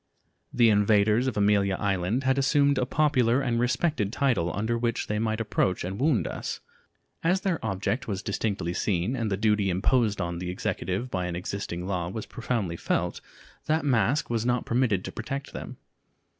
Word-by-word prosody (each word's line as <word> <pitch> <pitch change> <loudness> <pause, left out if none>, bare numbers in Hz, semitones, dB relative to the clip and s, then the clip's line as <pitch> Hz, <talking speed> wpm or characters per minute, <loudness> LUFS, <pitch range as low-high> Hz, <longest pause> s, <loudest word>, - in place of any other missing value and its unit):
The 120 -2 +4
invaders 105 +3 +3
of 125 - -2
Amelia 100 -1 +3
Island 100 +5 0
had 130 +1 +2
assumed 140 0 +3
a 125 - 0
popular 130 -5 +2
and 120 -4 0
respected 125 - 0
title 120 - +1
under 110 +3 0
which 115 -1 -1
they 105 0 -2
might 110 0 -1
approach 100 -4 0
and 95 +3 -4
wound 140 -4 +2
us. - - -4 0.6
As 180 +3 +2
their 185 - -1
object 110 +4 -2
was 100 -1 -3
distinctly 100 -4 -2
seen, 95 +5 0
and 115 -4 -1
the 95 - -1
duty 105 -1 +2
imposed 105 +3 +2
on 85 -2 -2
the 90 0 -4
Executive 95 +5 -3
by 90 -1 -1
an 85 - -3
existing 90 -1 -4
law 90 -3 -2
was 110 +3 -5
profoundly 115 -9 -3
felt, - - -1 0.5
that 155 0 +1
mask 135 +2 +2
was 115 -2 -1
not 120 0 0
permitted 115 -6 +1
to - - -5
protect 135 +5 -5
them. - - -7
110 Hz, 175 wpm, -27 LUFS, 95-125 Hz, 0.6 s, The